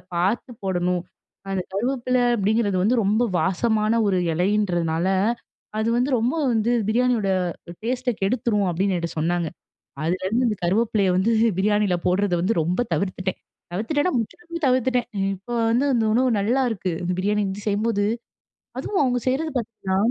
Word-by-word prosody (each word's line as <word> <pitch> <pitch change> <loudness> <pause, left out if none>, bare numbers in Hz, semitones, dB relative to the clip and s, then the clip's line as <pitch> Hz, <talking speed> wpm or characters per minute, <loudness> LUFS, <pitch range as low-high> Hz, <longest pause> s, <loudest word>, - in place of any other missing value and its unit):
பார்த்து 195 +8 0
போடணும். 180 -1 0 0.5
அந்த 190 -1 0
கருவேப்பில 250 +4 0 0.2
அப்டிங்கறது 205 -1 +1
வந்து 225 +6 +3
ரொம்ப 210 +4 +2 0.2
வாசமான 215 +5 +1
ஒரு 190 -2 +2 0.2
இலைன்றதுனால, 175 -2 +1 0.7
அது 220 +1 +1
வந்து 250 +3 +1
ரொம்ப 235 +3 +1 0.2
வந்து 225 +1 +1 0.2
பிரியாணியோட 235 -3 +2 0.5
டேஸ்ட்ட 250 +2 0
கெடுத்துரும்." 210 -1 +1
அப்டின்னு 185 +2 0
என்கிட்ட 170 0 -3
சொன்னாங்க. 170 +1 0 0.6
அதுலேருந்து 185 +9 0
இந்த 210 - -1
கருவேப்பிலைய 205 +2 +2
வந்து 195 +5 +2 0.3
பிரியாணியில 205 -1 +2
போட்றத 185 +2 +2
வந்து 210 +6 +1
ரொம்ப 175 +7 0
தவிர்த்துட்டேன். 190 -1 -2 0.3
தவிர்த்துட்டேன்னா, 290 - 0
முற்றிலுமே 335 +9 -5
தவிர்த்துட்டேன். 255 -1 +2 0.3
இப்போ 195 +6 -9 0.2
வந்து 240 +4 +2
அந்த 230 -2 +2
உணவு 255 +3 +3
நல்லாயிருக்கு. 225 -3 0
இந்த 175 +1 -1
பிரியாணி 210 +2 +1
வந்து 195 +2 -6
செய்யும்போது, 205 0 +1 0.7
அதுவும் 405 - -1
அவுங்க 250 -1 +1
செய்றது 300 +5 0
பாத்தீங்கன்னா, 210 -5 -3
210 Hz, 135 wpm, -23 LUFS, 185-240 Hz, 0.7 s, வந்து